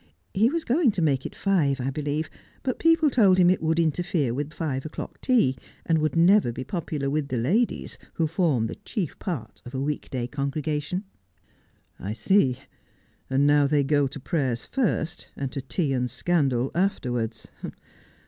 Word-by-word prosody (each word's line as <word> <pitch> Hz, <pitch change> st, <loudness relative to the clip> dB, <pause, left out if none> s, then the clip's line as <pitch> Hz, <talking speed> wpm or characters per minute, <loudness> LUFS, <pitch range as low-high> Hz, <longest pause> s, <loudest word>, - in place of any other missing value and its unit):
He 220 Hz, +5 st, +4 dB
was 330 Hz, +2 st, -2 dB
going 275 Hz, +2 st, +3 dB
to 180 Hz, -, -1 dB
make 135 Hz, -4 st, +1 dB
it -, -, -13 dB
five, 155 Hz, -9 st, +1 dB
I 130 Hz, +2 st, -1 dB
believe, 150 Hz, +2 st, -2 dB, 0.4 s
but 255 Hz, -, -2 dB
people 330 Hz, -2 st, +4 dB
told 200 Hz, -7 st, +5 dB
him 180 Hz, -1 st, +6 dB
it 185 Hz, -, 0 dB
would 160 Hz, +1 st, +1 dB
interfere 160 Hz, -5 st, +1 dB
with 145 Hz, +4 st, -3 dB
five 145 Hz, -4 st, -3 dB
o'clock 155 Hz, -, -7 dB
tea, 230 Hz, -, +3 dB, 0.3 s
aud 165 Hz, -1 st, +3 dB
would 155 Hz, +1 st, 0 dB
never 175 Hz, -, +5 dB
be 125 Hz, -, -5 dB
popular 145 Hz, -1 st, -3 dB
with 145 Hz, +1 st, 0 dB
the 130 Hz, -, -2 dB
ladies, 190 Hz, -, 0 dB, 0.2 s
who 165 Hz, -, +1 dB
form 155 Hz, -, +1 dB
the 115 Hz, -, -5 dB
chief 190 Hz, -, -4 dB
part 135 Hz, -, -5 dB
of 125 Hz, +2 st, -9 dB
a -, -, -1 dB
week 145 Hz, +2 st, -3 dB
day 125 Hz, -2 st, -2 dB
congregation.' 150 Hz, +6 st, -2 dB, 0.5 s
' -, -, -38 dB
I 100 Hz, +4 st, -4 dB
see. 130 Hz, -, +3 dB, 0.7 s
And 135 Hz, +2 st, +3 dB
now 145 Hz, -1 st, +5 dB
they 145 Hz, 0 st, +2 dB
go 145 Hz, 0 st, +2 dB
to 140 Hz, -, -7 dB
prayers 130 Hz, -5 st, -1 dB
first, 175 Hz, -9 st, -1 dB
and 135 Hz, -2 st, -4 dB
to 135 Hz, -, -3 dB
tea 135 Hz, +3 st, -1 dB
and 125 Hz, -1 st, 0 dB
scandal 135 Hz, -8 st, +1 dB
afterwards. 125 Hz, -, -1 dB
150 Hz, 175 wpm, -25 LUFS, 135-175 Hz, 0.7 s, him